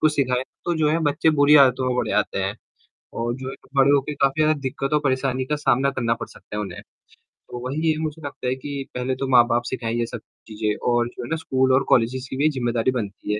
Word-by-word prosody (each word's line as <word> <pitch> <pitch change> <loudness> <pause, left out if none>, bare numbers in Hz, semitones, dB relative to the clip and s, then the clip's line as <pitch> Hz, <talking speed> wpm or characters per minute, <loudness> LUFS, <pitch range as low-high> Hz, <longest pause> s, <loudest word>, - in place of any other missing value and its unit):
कुछ 155 -1 +3
सिखाएँ, 130 -2 +1 0.2
तो 175 - 0
जो 150 - +3
है 165 - +2
बच्चे 155 +2 +2
बुरी 150 +1 +7
आदतों 130 -2 +5
में 125 - -1
बड़े - - -1
आते - - -1
हैं - - -2 0.6
और 120 +1 -1
जो 130 0 -6
है - - -7 0.2
बड़े 135 +1 +5
होके 145 +1 +2
काफ़ी 140 +2 +1
ज़्यादा 155 -1 +2
दिक्कतों, 135 +2 -1
परेशानी 130 -2 0
का 150 +3 -1
सामना 140 -1 +2
करना 115 -3 0
पड़ - - -7
सकता 105 - -11
है - - -1
उन्हें। 90 -3 -7 0.7
तो 120 - -6
वहीं 140 +4 -3
ये 160 -1 +2
मुझे 160 0 -4
लगता 135 -2 -5
है 125 - +1
कि 140 +1 -5
पहले 125 +1 -1
तो 135 +1 -3
माँ-बाप 120 -1 +4
सिखाएँ 115 -3 -3
ये 120 - +1
सब 120 0 -7 0.3
चीजें 105 -1 -2 0.2
और 120 0 +2
जो 120 - -8
है 120 - -7
ना 160 - 0
स्कूल 130 -4 +1
और 135 +1 +4
कॉलेजेज 125 +2 +2
की 130 - -5
भी 150 +3 +3
जिम्मेदारी 120 0 +1
बनती 105 -3 -4
है, 105 - -1
130 Hz, 240 wpm, -23 LUFS, 120-145 Hz, 0.7 s, बुरी